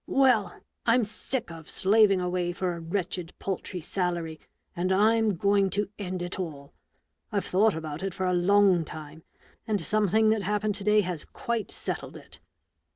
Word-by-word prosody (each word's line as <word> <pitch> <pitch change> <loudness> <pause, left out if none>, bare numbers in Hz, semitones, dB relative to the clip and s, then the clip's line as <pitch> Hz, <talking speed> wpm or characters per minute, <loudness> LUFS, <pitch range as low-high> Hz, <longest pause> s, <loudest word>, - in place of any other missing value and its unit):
Well! 255 -6 +3 0.3
I'm 235 +1 +4
sick 220 0 -2
of 165 -1 -10
slaving 200 -1 +4
away 180 -1 -1
for 180 0 -2
a 170 - -6
wretched 175 0 -3
paltry 190 -1 -4
salary, 170 -2 -2 0.4
and 180 +2 -1
I'm 215 +1 +3
going 200 +2 +2
to 205 -1 0
end 185 -2 -3
it 175 +2 -5
all, 150 -5 -6 0.6
I've 200 -2 -1
thought 205 +2 +3
about 155 -1 -5
it 195 -2 -3
for 190 - -2
a 180 - +1
long 190 0 +4
time, 155 0 -9 0.5
and 210 -2 +1
something 215 +1 +2
that 220 -1 +1
happened 210 +2 0
to 200 0 -2
day 210 +1 +4
has 175 -5 -4
quite 235 -2 -3
settled - - -5
it. - - -12
190 Hz, 165 wpm, -27 LUFS, 175-210 Hz, 0.6 s, I'm